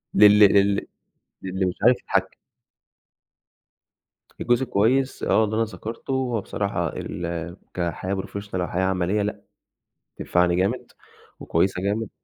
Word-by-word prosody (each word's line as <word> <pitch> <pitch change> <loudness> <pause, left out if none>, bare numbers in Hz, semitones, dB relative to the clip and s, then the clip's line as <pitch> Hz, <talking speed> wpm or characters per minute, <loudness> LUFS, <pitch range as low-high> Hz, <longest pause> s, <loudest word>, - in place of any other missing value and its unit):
لل 105 +1 +7
لل 100 -1 +4 0.6
للي 95 0 -2
مش 90 - -3
عارف 120 +2 +6
يتحكّم. - - -1 2.1
الجزء 120 +2 +2
الكويس 130 +4 +1
آه، 110 - +3
اللي 110 +1 -3
أنا 115 - +2
ذكرته 115 +3 -7
هو 125 -4 -1
بصراحة 100 -4 -2
ال 85 0 -5 0.2
كحياة 90 +2 -2
professional 100 +1 -6
أو 90 -1 -1
حياة 95 +2 -1
عملية 95 +2 0
لأ، 105 +1 -3 0.8
تنفعني 90 0 +1
جامد 95 +2 -1 0.5
وكويسة 90 +2 0
جامد 105 +2 -1
100 Hz, 125 wpm, -24 LUFS, 90-110 Hz, 2.1 s, لل